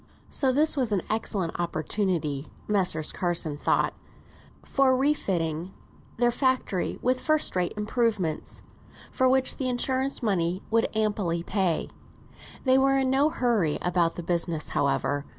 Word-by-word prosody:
So 265 Hz, -2 st, +2 dB
this 305 Hz, +4 st, +3 dB
was 255 Hz, -6 st, 0 dB
an 195 Hz, -4 st, 0 dB
excellent 200 Hz, -6 st, -1 dB
opportunity, 160 Hz, -3 st, -1 dB, 0.2 s
Messrs. 180 Hz, -7 st, +1 dB
Carson 170 Hz, -4 st, 0 dB
thought, 145 Hz, -, +1 dB, 0.7 s
for 265 Hz, -2 st, +2 dB
refitting 185 Hz, -, -1 dB, 0.4 s
their 240 Hz, +1 st, +3 dB
factory 255 Hz, -7 st, 0 dB
with 255 Hz, +1 st, +1 dB
first 310 Hz, -8 st, +1 dB
rate 180 Hz, -1 st, 0 dB
improvements, 210 Hz, -6 st, -1 dB, 0.5 s
for 260 Hz, 0 st, +2 dB
which 260 Hz, 0 st, +3 dB
the 260 Hz, -2 st, -1 dB
insurance 260 Hz, +2 st, 0 dB
money 185 Hz, -3 st, 0 dB
would 230 Hz, 0 st, +3 dB
amply 200 Hz, -6 st, 0 dB
pay. 185 Hz, -4 st, 0 dB, 0.8 s
They 260 Hz, 0 st, +4 dB
were 270 Hz, 0 st, +3 dB
in 265 Hz, -1 st, +1 dB
no 280 Hz, +3 st, +3 dB
hurry 225 Hz, -, 0 dB
about 175 Hz, -2 st, +1 dB
the 175 Hz, -, -6 dB
business, 170 Hz, -2 st, -1 dB
however. 140 Hz, 0 st, 0 dB
205 Hz, 135 wpm, -26 LUFS, 170-260 Hz, 0.8 s, They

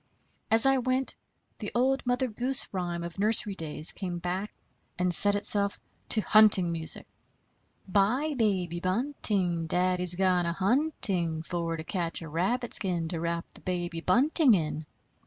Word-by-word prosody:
As 225 Hz, +2 st, +2 dB
I 270 Hz, 0 st, +3 dB
went, 255 Hz, +1 st, -2 dB, 0.5 s
the 210 Hz, -, -6 dB
old 265 Hz, +2 st, 0 dB
Mother 250 Hz, +1 st, 0 dB
Goose 245 Hz, +3 st, -2 dB
rhyme 175 Hz, -2 st, -4 dB
of 170 Hz, +2 st, -9 dB
nursery 210 Hz, 0 st, +4 dB
days 160 Hz, -3 st, -1 dB
came 180 Hz, -3 st, -6 dB
back 180 Hz, +4 st, -5 dB, 0.5 s
and 180 Hz, 0 st, 0 dB
set 205 Hz, +3 st, +8 dB
itself 200 Hz, 0 st, +4 dB, 0.3 s
to 220 Hz, -, +4 dB
hunting 205 Hz, -5 st, +4 dB
music: 160 Hz, -1 st, 0 dB, 0.8 s
Bye, 220 Hz, +11 st, 0 dB
baby 185 Hz, -7 st, -1 dB
bunting, 185 Hz, -, -1 dB
Daddy's 180 Hz, +1 st, 0 dB
gone 180 Hz, -2 st, +1 dB
a 170 Hz, -, -2 dB
hunting, 190 Hz, -, 0 dB
For 165 Hz, -1 st, -4 dB
to 160 Hz, -, -7 dB
catch 170 Hz, -2 st, -4 dB
a -, -, -9 dB
rabbit 220 Hz, -, -2 dB
skin 175 Hz, -4 st, -2 dB
To 165 Hz, -, -5 dB
wrap 170 Hz, 0 st, -3 dB
the -, -, -13 dB
baby 175 Hz, -2 st, -4 dB
bunting 260 Hz, -, +3 dB
in. 155 Hz, -2 st, -4 dB
185 Hz, 150 wpm, -27 LUFS, 170-225 Hz, 0.8 s, set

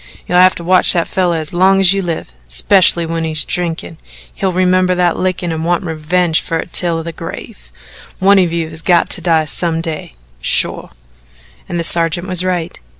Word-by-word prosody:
You'll 180 Hz, -, +2 dB
have 185 Hz, -1 st, +5 dB
to 170 Hz, -, -8 dB
watch 185 Hz, +2 st, +4 dB
that 170 Hz, -2 st, 0 dB
feller 180 Hz, -3 st, 0 dB
as 155 Hz, 0 st, -5 dB
long 190 Hz, +2 st, +3 dB
as 190 Hz, -1 st, +5 dB
you 195 Hz, -, -1 dB
live 165 Hz, -, -5 dB
'specially 170 Hz, -, +3 dB
when 165 Hz, 0 st, -3 dB
he's 155 Hz, -2 st, -2 dB
drinking. 170 Hz, -2 st, -3 dB, 0.3 s
He'll 190 Hz, -1 st, -2 dB
remember 185 Hz, 0 st, +1 dB
that 175 Hz, -1 st, +1 dB
lickin' 185 Hz, -2 st, -2 dB
and 160 Hz, 0 st, -4 dB
want 175 Hz, +2 st, 0 dB
revenge 165 Hz, +1 st, -1 dB
fer 165 Hz, -, -3 dB
it 165 Hz, -, -7 dB
till 165 Hz, -2 st, 0 dB
the 170 Hz, -, -6 dB
grave. -, -, -10 dB, 0.5 s
One 195 Hz, +1 st, +4 dB
of 180 Hz, -3 st, +1 dB
you 165 Hz, -1 st, -3 dB
has 160 Hz, +1 st, -8 dB
got 175 Hz, -1 st, +2 dB
to -, -, -2 dB
die 160 Hz, -3 st, +1 dB
some 165 Hz, +1 st, -1 dB
day 160 Hz, -, -6 dB, 0.3 s
shore." -, -, +1 dB, 0.8 s
And 175 Hz, -, -3 dB
the -, -, -1 dB
sergeant 170 Hz, +1 st, +2 dB
was 185 Hz, -1 st, +3 dB
right. 180 Hz, -2 st, -3 dB
170 Hz, 195 wpm, -14 LUFS, 165-180 Hz, 0.8 s, have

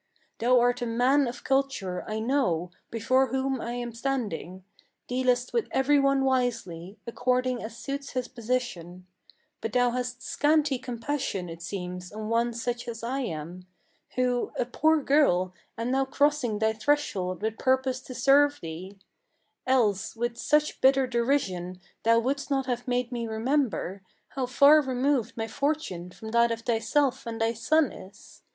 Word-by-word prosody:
Thou 245 Hz, +2 st, +4 dB
art 245 Hz, +1 st, +2 dB
a 240 Hz, -, -1 dB
man 255 Hz, +4 st, +3 dB
of 240 Hz, -, -6 dB
culture, 265 Hz, -10 st, 0 dB
I 215 Hz, -, -2 dB
know, 220 Hz, -, 0 dB, 0.2 s
before 255 Hz, +4 st, +2 dB
whom 265 Hz, +1 st, -1 dB
I 235 Hz, -, -4 dB
am 240 Hz, -1 st, -4 dB
standing; 215 Hz, -8 st, -3 dB, 0.4 s
Dealest 250 Hz, -1 st, 0 dB
with 470 Hz, -3 st, +1 dB
every 285 Hz, +2 st, +3 dB
one 275 Hz, -1 st, +3 dB
wisely, 225 Hz, -8 st, -1 dB
according 250 Hz, +1 st, 0 dB
as 225 Hz, +1 st, -7 dB
suits 275 Hz, +1 st, -5 dB
his 255 Hz, -1 st, -2 dB
position; 215 Hz, -8 st, -4 dB, 0.6 s
But 225 Hz, -, -4 dB
thou 245 Hz, -1 st, +3 dB
hast 250 Hz, 0 st, -4 dB
scanty 295 Hz, -3 st, +2 dB
compassion, 245 Hz, -6 st, -3 dB
it 165 Hz, 0 st, -9 dB
seems, 180 Hz, 0 st, -6 dB
on 215 Hz, +1 st, -6 dB
one 235 Hz, +1 st, +2 dB
such 235 Hz, +1 st, -3 dB
as 230 Hz, -1 st, -6 dB
I 260 Hz, +4 st, -2 dB
am, 175 Hz, -, -5 dB, 0.5 s
Who, 250 Hz, -1 st, 0 dB
a 245 Hz, -, +1 dB
poor 310 Hz, +4 st, +2 dB
girl, 185 Hz, -12 st, +3 dB, 0.2 s
am 230 Hz, +2 st, -2 dB
now 270 Hz, +1 st, +2 dB
crossing 285 Hz, -5 st, +1 dB
thy 220 Hz, +1 st, +1 dB
threshold 215 Hz, -7 st, -1 dB
with 220 Hz, 0 st, -2 dB
purpose 260 Hz, 0 st, +1 dB
to 255 Hz, -1 st, -9 dB
serve 280 Hz, +3 st, +4 dB
thee; 175 Hz, +5 st, -8 dB, 0.7 s
Else, 220 Hz, -8 st, +2 dB
with 240 Hz, +1 st, -2 dB
such 300 Hz, +5 st, +1 dB
bitter 265 Hz, 0 st, +5 dB
derision, 235 Hz, -8 st, -1 dB, 0.2 s
thou 230 Hz, +1 st, +4 dB
wouldst 275 Hz, +5 st, -1 dB
not 270 Hz, -2 st, +1 dB
have 245 Hz, -1 st, -3 dB
made 250 Hz, 0 st, 0 dB
me 235 Hz, -2 st, -3 dB
remember 220 Hz, -, -1 dB, 0.3 s
How 260 Hz, -2 st, -3 dB
far 285 Hz, +5 st, +6 dB
removed 260 Hz, -3 st, 0 dB
my 225 Hz, 0 st, -2 dB
fortune 280 Hz, -, -2 dB
from 220 Hz, +4 st, -9 dB
that 235 Hz, +1 st, +3 dB
of 230 Hz, 0 st, -3 dB
thyself 255 Hz, +3 st, 0 dB
and 225 Hz, 0 st, -4 dB
thy 225 Hz, +1 st, +1 dB
son 305 Hz, +5 st, +2 dB
is. 195 Hz, +3 st, -14 dB
245 Hz, 160 wpm, -27 LUFS, 220-265 Hz, 0.7 s, far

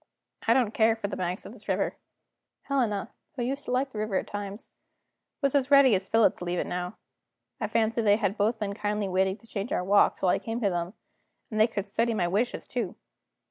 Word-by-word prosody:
"I 230 Hz, -, +5 dB
don't 240 Hz, -5 st, +2 dB
care 225 Hz, 0 st, +4 dB
for 225 Hz, -3 st, -4 dB
the -, -, -4 dB
banks 180 Hz, +1 st, -3 dB
of -, -, -9 dB
this -, -, -16 dB
river." -, -, 0 dB, 0.7 s
Helena, 230 Hz, -6 st, -1 dB, 0.2 s
who 250 Hz, -, -2 dB
used 275 Hz, +4 st, -3 dB
to -, -, -4 dB
like 260 Hz, +2 st, +1 dB
the 215 Hz, -, -6 dB
river 215 Hz, -2 st, -2 dB
at -, -, +3 dB
other -, -, -12 dB
times, 205 Hz, +2 st, -6 dB, 0.7 s
was 275 Hz, -, +2 dB
as 280 Hz, -2 st, +2 dB
ready 275 Hz, -4 st, +7 dB
as 190 Hz, 0 st, 0 dB
Philip 225 Hz, -1 st, +3 dB
to -, -, -6 dB
leave 175 Hz, 0 st, -2 dB
it -, -, 0 dB
now. 180 Hz, +3 st, -4 dB, 0.6 s
I -, -, -1 dB
fancy 225 Hz, +1 st, +1 dB
they 205 Hz, -2 st, +5 dB
had 200 Hz, -3 st, 0 dB
both 220 Hz, +2 st, +1 dB
been 205 Hz, -2 st, -3 dB
kindly 210 Hz, 0 st, -1 dB
waiting 190 Hz, +1 st, +1 dB
to 230 Hz, -, -21 dB
change 215 Hz, 0 st, -4 dB
our -, -, 0 dB
walk, 200 Hz, +2 st, +4 dB
till 185 Hz, -, +1 dB
I -, -, +3 dB
came 225 Hz, +1 st, -4 dB
to 200 Hz, -3 st, +2 dB
them, 175 Hz, +3 st, -3 dB, 0.6 s
and 215 Hz, -, -2 dB
they 220 Hz, -, +6 dB
could 205 Hz, -4 st, -3 dB
study 230 Hz, +3 st, 0 dB
my 175 Hz, -4 st, +1 dB
wishes 210 Hz, +7 st, -1 dB
too. 235 Hz, -7 st, -3 dB
215 Hz, 230 wpm, -28 LUFS, 195-230 Hz, 0.7 s, ready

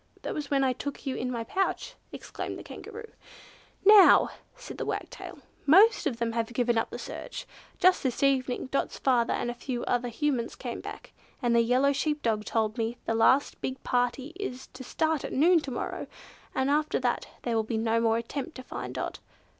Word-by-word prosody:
"That -, -, -3 dB
was 295 Hz, -2 st, -4 dB
when 275 Hz, -1 st, +2 dB
I 260 Hz, -1 st, +2 dB
took 285 Hz, +3 st, -6 dB
you 265 Hz, -2 st, -2 dB
in 250 Hz, -, -2 dB
my 235 Hz, -2 st, -3 dB
pouch!" 385 Hz, -, -1 dB, 0.2 s
exclaimed -, -, -6 dB
the -, -, -9 dB
Kangaroo. 450 Hz, +1 st, -9 dB, 0.7 s
"Now," 415 Hz, -1 st, +8 dB, 0.3 s
said -, -, -10 dB
the -, -, -2 dB
Wagtail, -, -, -5 dB, 0.3 s
"most 390 Hz, +6 st, +6 dB
of 250 Hz, -6 st, -2 dB
them 235 Hz, -1 st, -1 dB
have 230 Hz, 0 st, -2 dB
given 240 Hz, -1 st, +1 dB
up 225 Hz, -, 0 dB
the -, -, -6 dB
search. -, -, -7 dB, 0.3 s
Just 370 Hz, 0 st, +4 dB
this 260 Hz, 0 st, -1 dB
evening 260 Hz, -2 st, +1 dB
Dot's 275 Hz, -, -1 dB
father 245 Hz, -3 st, +2 dB
and 240 Hz, -, -2 dB
a -, -, -5 dB
few 245 Hz, 0 st, -4 dB
other 245 Hz, 0 st, 0 dB
Humans 250 Hz, -1 st, -1 dB
came -, -, -5 dB
back, -, -, -9 dB, 0.3 s
and 240 Hz, -3 st, +1 dB
the 235 Hz, -, +6 dB
yellow 255 Hz, +4 st, +3 dB
sheep 300 Hz, +1 st, -1 dB
dog 215 Hz, -2 st, 0 dB
told 220 Hz, +1 st, -1 dB
me 230 Hz, +2 st, -1 dB
the -, -, 0 dB
last 260 Hz, +5 st, +3 dB
big 260 Hz, 0 st, -4 dB
party 250 Hz, +4 st, 0 dB
is 260 Hz, -10 st, -5 dB
to 255 Hz, +1 st, -9 dB
start 315 Hz, +3 st, 0 dB
at -, -, -5 dB
noon 335 Hz, +5 st, +5 dB
to 290 Hz, -, -6 dB
morrow, 250 Hz, -, -4 dB, 0.5 s
and 265 Hz, +1 st, +1 dB
after 300 Hz, +1 st, +1 dB
that -, -, 0 dB, 0.2 s
there 235 Hz, -2 st, -1 dB
will 225 Hz, -, +3 dB
be 220 Hz, +1 st, -3 dB
no 225 Hz, +1 st, +1 dB
more 225 Hz, -1 st, +2 dB
attempt 275 Hz, +7 st, -5 dB
to 255 Hz, -, -8 dB
find -, -, -6 dB
Dot. -, -, -4 dB
255 Hz, 200 wpm, -28 LUFS, 235-290 Hz, 0.7 s, Now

